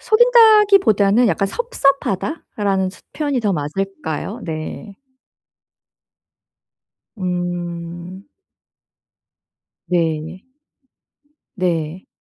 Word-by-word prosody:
속인다기보다는 410 - +5
약간 195 - +1
"섭섭하다."라는 220 - -1
스 195 - -17
표현이 285 -4 -1
더 210 -3 0
맞을까요? 185 +5 -4
네. 165 +5 -6 2.2
음. 175 +1 -5 1.6
네. 165 +1 -2 1.1
네. 175 -2 -2
195 Hz, 140 characters per minute, -19 LUFS, 175-250 Hz, 2.2 s, 속인다기보다는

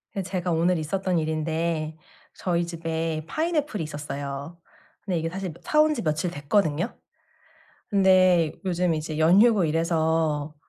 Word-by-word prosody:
예 195 - -1
제가 180 -1 -2
오늘 170 +2 +2
있었던 180 +3 -1
일인데 160 0 -2 0.4
저희 175 -2 0
집에 165 -2 -3
파인애플이 305 - -1
있었어요. 145 +1 -6 0.4
근데 180 -5 -2
이게 165 +1 -2
사실 190 0 -5
며 165 - -15
사 305 - +3
온 305 0 +3
지 240 - -3
며칠 155 +1 -1
됐거든요. 160 +4 0 0.9
근데 185 -5 +4
요즘 180 -1 +1
이제 155 0 -4
연휴고 195 +5 +5
이래서 160 -2 0
165 Hz, 290 characters per minute, -25 LUFS, 155-185 Hz, 0.9 s, 연휴고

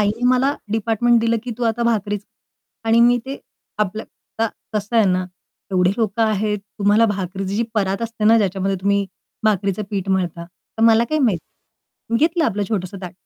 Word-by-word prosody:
आईने 210 +4 0
मला 260 +3 +3 0.2
डिपार्टमेंट 225 +2 +2
दिलं 230 0 +2
की 250 - -4
तू - - -4
आता 230 +1 0
भाकरीच 210 -3 0 0.6
आणि 225 +1 +4
मी 240 +1 +5
ते 270 +1 -5 0.4
आपलं 210 +1 -1
आता 225 0 -5 0.2
कसं 210 +2 -2
आहे 225 - +6
ना? 185 0 +1 0.5
एवढे 180 -1 +3
लोकं 225 -1 0
आहेत, 210 -1 +1 0.2
तुम्हाला 210 +3 +4
भाकरीची 195 -1 -3
जी 230 - +2
परात 195 0 0
असते 230 -2 -3
ना, 225 +2 +6
ज्याच्यामध्ये 195 -1 0
तुम्ही 200 +1 +1 0.4
भाकरीचं 200 -1 +1
पीठ 195 -2 -3
मळता? 175 -3 -1
तर 180 +5 -9
मला 225 0 +6
काय 310 - +2
माहीत. 230 - +2 0.7
मी 230 - +2
घेतलं 325 +3 +2
आपलं 210 -5 0
छोटंसं 195 -2 -3
ताट. 180 - -6
210 Hz, 175 wpm, -20 LUFS, 195-230 Hz, 0.7 s, आहे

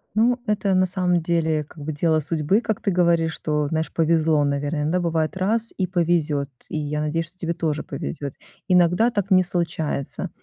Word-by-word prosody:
Ну, 240 +3 +3
это 205 -3 +1
на 185 0 +4
самом 180 -2 +1
деле, 160 -2 +1
как 150 +1 -16
бы, 155 - -3
дело 155 +1 +1
судьбы. 160 +7 +1
Как 220 -3 -2
ты 200 - 0
говоришь, 170 -2 +2
что, 150 -1 -1
знаешь, 160 0 -1
повезло, 160 -2 +2
наверное. 145 +1 -1
Да, 180 +4 +1
бывает, 165 -1 -1
раз- 220 +4 0
и 185 -2 0
повезёт, 165 -5 0 0.2
и - - -3
я 150 0 -2
надеюсь, 160 +2 -1
что 185 - -22
тебе 170 -1 -2
тоже 155 -2 -1
повезёт. 140 0 -5 0.3
Иногда 180 +5 +4
так 205 -3 -2
не 185 0 +7
случается, 165 -5 -3
165 Hz, 185 wpm, -23 LUFS, 155-185 Hz, 0.3 s, не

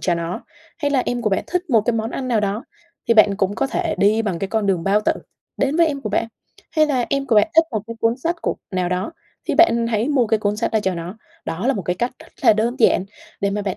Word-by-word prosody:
cho 175 - +1
nó. 170 +1 -4 0.4
Hay 290 - 0
là 270 -3 +2
em 245 0 -1
của 215 - +1
bạn 195 - 0
thích 360 -2 -2
một 230 -4 +5
cái 240 +3 0
món 225 0 -2
ăn 255 0 -4
nào 230 -3 +2
đó 205 +4 -2 0.4
thì 230 - +5
bạn 210 -2 +5
cũng 195 0 0
có 275 - 0
thể 345 +4 -1
đi 215 +3 +3
bằng 195 -6 -2
cái 195 - -3
con 220 0 0
đường 185 -4 +1
bao 200 +2 +3
tử 210 - +2 0.4
đến 275 +2 0
với 335 -1 +5
em 285 -3 -2
của 220 - -4
bạn, 215 +2 0 0.5
Hay 310 0 +5
là 260 -5 0
em 275 0 0
của 245 - +2
bạn 210 - +5
thích 325 - +7
một 220 -4 -1
cái 230 - -6
cuốn 230 +1 +2
sách 330 +6 -2
của - - 0 0.2
nào 180 -1 0
đó 185 - -2 0.4
thì 305 - +1
bạn 235 -7 +4
hãy 230 +2 0
mua 270 -5 +2
cái 220 0 +2
cuốn 210 0 -1
sách - - -1
đó 220 - +2
cho 190 -2 0
nó. 170 +4 -6 0.3
Đó 180 +8 -3
là 270 - +3
một 200 - -3
cái 180 +1 -2
cách 240 +6 -1
rất - - -15
là - - +7
đơn 225 +4 0
giản 205 -5 +4 0.4
để 200 - +1
mà 205 +1 -2
bạn 195 -2 -3
220 Hz, 290 wpm, -21 LUFS, 200-260 Hz, 0.5 s, thích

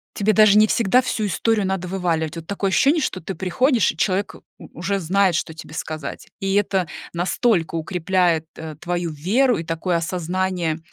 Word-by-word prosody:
тебе 210 +1 +2
даже 210 0 +6
не 215 - +7
всегда 230 +3 +3
всю 215 -4 -2
историю 210 +3 +1
надо 190 -1 -2
вываливать. 170 -4 -1
Вот 165 -1 -8
такое 200 -1 -1
ощущение, 290 - +3
что 185 -8 -2
ты 190 +3 -6
приходишь, 230 +6 +2
и - - -15
человек, 195 +3 0
э, - - -13 0.2
у - - -13
уже 195 +2 -1
знает, 190 +1 +2
что 160 - -2
тебе 155 -1 -11
сказать. 155 -2 -6
И 195 0 0
это 195 -4 +1 0.3
настолько 175 0 0
укрепляет, 175 0 0
э, 160 -1 -8
твою 175 -1 -2
веру 220 - +2
и 165 - -4
такое 165 +2 -2
осознание, 175 -1 -2
185 Hz, 180 wpm, -22 LUFS, 165-200 Hz, 0.3 s, не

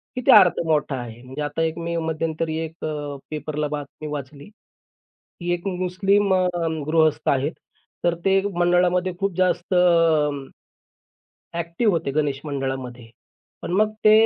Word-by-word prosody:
किती 250 - +3
अर्थ 190 -5 +7
मोठा 150 -3 +1
आहे. 120 -1 -9
म्हणजे 130 +3 -7
आता 145 +2 -2
एक 160 0 0
मी 170 0 -3
मध्यंतरी 160 0 -2
एक 160 +1 -8
अ, 145 -2 -4 0.2
पेपरला 150 0 -3
बातमी 150 +1 -6
वाचली, 140 0 -7 0.7
की 175 0 -5
एक 175 +2 -4
मुस्लिम 190 +2 +1
अ, 185 - +3 0.5
गृहस्थ 155 -1 +2
आहेत. 140 +3 +1 0.5
तर 175 0 +2
ते 195 0 +4
मंडळामध्ये 180 +1 +2
खूप 195 -2 -1
जास्त 185 0 +1 1.8
एक्टिव्ह 170 +6 0
होते 165 -4 -1
गणेश 145 -1 0
मंडळामध्ये. 130 -4 -4 0.5
पण - - -5
मग 215 +3 +2
ते 215 - +8
160 Hz, 135 wpm, -23 LUFS, 145-180 Hz, 1.8 s, ते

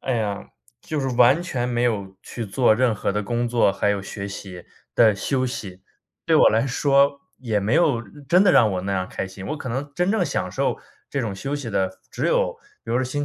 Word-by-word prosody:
哎 130 - -1
呀， 105 -2 -3 0.3
就 155 -3 -3
是 135 - -1
完 130 +7 +5
全 125 -8 -2
没 120 -1 0
有 100 -5 -1
去 115 -2 -6
做 110 +3 +3
任 125 -1 +2
何 100 - -2
的 105 +1 -1
工 120 +2 -1
作， 115 -4 +3
还 100 +1 0
有 100 -1 -1
学 100 +1 -6
习， 95 -3 -8 0.3
的 110 -2 +6
休 130 +6 -1
息， 95 -7 -7 0.4
对 - - +4
我 - - +7
来 110 +3 +2
说 140 +1 +2 0.2
也 115 -5 -1
没 105 +5 0
有 150 -9 +3
嗯， 115 +6 -14
真 180 +5 +5
的 180 - +5
让 110 - +5
我 90 - -1
那 100 +1 -2
样 95 -1 -2
开 - - -4
心。 95 +1 -10
我 155 - -2
可 130 - -6
能 140 +4 -4
真 180 +3 0
正 205 -5 +1
享 140 - -2
受 - - -1 0.3
这 140 - -1
种 110 -5 -3
休 135 +9 -3
息 135 -5 -6
的 95 -2 -1
只 - - -2
有 - - +1 0.3
比 115 - -7
如 125 - +2
星 145 +3 -2
120 Hz, 250 characters per minute, -23 LUFS, 100-140 Hz, 0.4 s, 我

